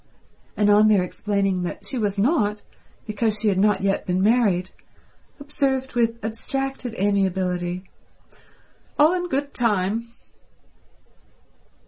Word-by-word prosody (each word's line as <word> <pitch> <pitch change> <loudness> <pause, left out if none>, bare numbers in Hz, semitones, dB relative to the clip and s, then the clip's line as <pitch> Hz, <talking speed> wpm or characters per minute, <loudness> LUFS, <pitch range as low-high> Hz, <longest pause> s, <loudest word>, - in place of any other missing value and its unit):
And 205 0 +3
on 210 +1 +6
their 205 -4 +4
explaining 195 0 -1
that 175 - -5
she 260 - -4
was 205 -2 -1
not, 210 -3 +1 0.4
because 215 0 -1
she 215 - +2
had 190 -2 +1
not 205 -1 +3
yet 195 0 0
been 180 0 0
married, 200 -5 +2 0.7
observed 275 -2 -1
with 230 -1 +1
abstracted 260 +2 -4
amiability, 185 -3 0 1.1
"All 305 +4 +5
in 355 -1 -2
good 280 -1 -2
time." 220 0 0
210 Hz, 115 wpm, -23 LUFS, 195-245 Hz, 1.1 s, on